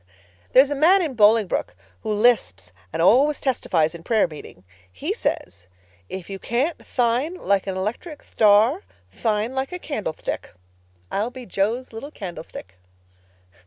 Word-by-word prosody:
There 260 - +9
is 285 - -6
a - - 0
man 355 +7 +5
in 305 -5 -3
Bolingbroke 215 - +3 0.3
who - - -3
lisps 205 - +2 0.2
and 165 - -1
always 275 +10 +4
testifies 170 - 0
in 170 - -9
prayer 220 +3 +2
meeting. 150 - -12 0.3
He 90 - -3
says, 90 0 -4 0.4
'If 190 -2 -6
you 195 -1 -6
can't 270 - -1
thine 250 +7 0
like 200 - 0
an 190 -1 -3
electric 235 - -5
thtar 220 - +4 0.3
thine 220 +2 -1
like 265 0 -2
a 360 - -4
candlethtick.' 215 - -5 0.6
I'll 210 +4 -1
be 250 0 -10
Jo's 225 +6 -2
little 225 +6 -7
candlestick." 165 - -9
220 Hz, 145 wpm, -23 LUFS, 185-265 Hz, 0.6 s, There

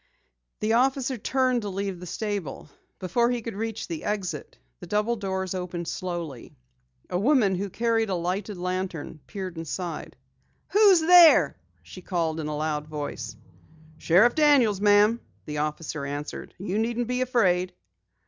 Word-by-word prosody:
The 215 +1 +1
officer 260 +2 +2
turned 255 +1 +1
to 205 - -4
leave 195 -1 -3
the 180 - -9
stable. 195 -8 -4 0.3
Before 235 +6 +1
he 245 -2 -2
could 230 - -5
reach 220 +2 -4
the 165 -3 -5
exit, 185 -8 -4 0.2
the - - -10
double 210 +3 +1
doors 190 -3 -3 0.3
slowly 170 -7 -5
opened. - - -19 0.6
A 180 - 0
woman, 230 -4 +3
who 195 +2 -2
carried 225 +1 0
a 190 - 0
lighted 185 +4 -3
lantern, 180 -3 -4
peered 185 -4 -6
inside. 165 +1 -5 0.5
"Who's 400 -4 +6
there?" 340 -1 +7 0.3
she 185 - -11
called 165 -3 -1
in 155 - -3
a 150 -1 -3
loud 150 -1 -2
voice. 145 -7 -6 0.6
"Sheriff 195 +9 +5
Daniels, 270 -10 +4
ma'am," 210 +3 +4 0.2
the 150 -1 -4
officer 150 0 -3
answered. 145 +1 -6
"You 195 +2 -2
needn't 235 +1 -1
be 250 +1 -1
afraid." 185 -8 +1
195 Hz, 150 wpm, -26 LUFS, 170-235 Hz, 0.6 s, there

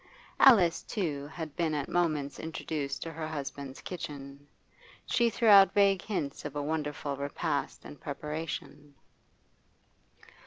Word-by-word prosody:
Alice, 195 -11 +6
too, 150 -9 -3
had 160 -1 -7
been 165 -3 0
at 145 -2 -2
moments 155 -5 0
introduced 150 -3 -4
to 165 - -5
her 160 0 -4
husband's 140 -3 -6
kitchen; 145 -5 -7 0.6
she 235 -1 +2
threw 230 0 0
out 200 -2 +8
vague 200 -2 +4
hints 155 -10 -3
of 145 - -6
a 145 - -2
wonderful 150 -2 -2
repast 140 - -3
in 75 +1 -9
preparation. 150 -1 -6
150 Hz, 125 wpm, -30 LUFS, 140-170 Hz, 0.6 s, out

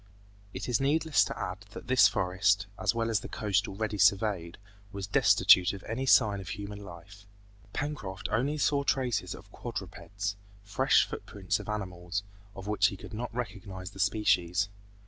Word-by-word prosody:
It - - -6
is 125 -1 +1
needless 155 +3 +3
to - - -5
add 90 +2 -4
that - - -8
this 125 -5 +6
forest, 95 +1 +1
as 95 +3 +1
well 115 0 0
as 110 - +2
the - - -8
coast 105 -3 0
already 105 +1 -3
surveyed, 100 -4 +2 0.3
was 100 -1 -5
destitute 90 -1 +5
of 100 - -8
any 130 +4 -3
sign 105 -6 +5
of 95 - -8
human 100 -1 -6
life. 100 +3 -12 0.4
Pencroft 115 -10 -4
only 135 +8 +1
saw 145 -1 +2
traces 120 -10 0
of - - -15
quadrupeds, 100 0 -5 0.3
fresh 105 0 +3
footprints 95 -2 -3
of - - -8
animals, 95 -2 -3 0.3
of 95 - -8
which 105 -1 +3
he 100 - -5
could - - -11
not 120 +3 -4
recognize 100 -5 -5
the 95 - -13
species. 100 -2 +2
100 Hz, 165 wpm, -29 LUFS, 95-110 Hz, 0.4 s, this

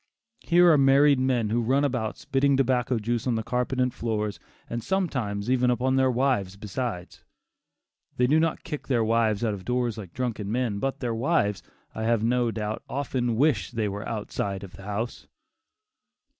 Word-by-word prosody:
Here 175 -5 +4
are 150 - +5
married 140 +1 +5
men 125 -5 +1
who 120 +2 +2
run 135 +5 +2
about 120 -6 -2
spitting 135 0 +1
tobacco 125 -2 +1
juice 115 +2 -2
on 120 - +1
the 110 - -2
carpet 125 +3 -1
and 125 -1 +1
floors, 105 -3 -2 0.3
and 120 -1 -4
sometimes 130 - -1
even 125 0 +2
upon 125 +2 +1
their 130 0 +3
wives 125 -7 0
besides. 105 -3 -5 0.9
They 125 - +3
do 150 +5 +4
not 165 0 0
kick 150 - -6
their 120 -4 +2
wives 110 -1 +1
out 110 - 0
of 95 -2 -7
doors 120 0 -1
like 95 -5 -9
drunken 115 -5 -3
men, 115 -4 -1
but 135 +4 -2
their 120 -3 -1
wives, 115 - +1 0.3
I 110 - -3
have 115 -1 +2
no 120 +1 +2
doubt, 110 -1 -3
often 130 -4 -1
wish 145 +5 +2
they 115 -3 -1
were 100 +1 -5
outside 100 -2 -3
of 95 -1 -10
the 100 0 -12
house. 105 +4 -4
120 Hz, 180 wpm, -26 LUFS, 110-130 Hz, 0.9 s, are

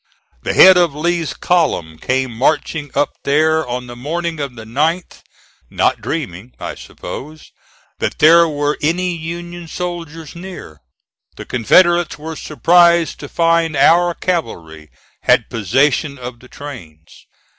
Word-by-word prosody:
The - - -3
head 185 0 +8
of 170 -5 +2
Lee's 170 -1 -1
column 85 - 0
came 130 -1 -1
marching 145 +3 0
up 145 +1 +1
there 155 +2 +2
on 125 +1 -4
the 120 0 -10
morning 165 +5 -4
of 140 -4 -4
the 110 -2 -10
9th, 155 +10 -2 0.5
not - - 0
dreaming, 120 - -5
I - - -5
suppose, 155 +3 -10 0.5
that - - -2
there 170 +2 +6
were 145 0 -1
any 175 +4 0
Union 170 +1 -7
soldiers 165 -2 -6
near. 170 - -10 0.5
The - - -9
Confederates 175 - +3
were 160 +2 -7
surprised 170 +2 +3
to 145 - -8
find 165 -2 +1
our 175 +4 +4
cavalry 85 - -4 0.3
had - - +2
possession 140 - +1
of 125 -1 -8
the 125 - -16
trains. 90 - -12
155 Hz, 135 wpm, -17 LUFS, 125-170 Hz, 0.5 s, head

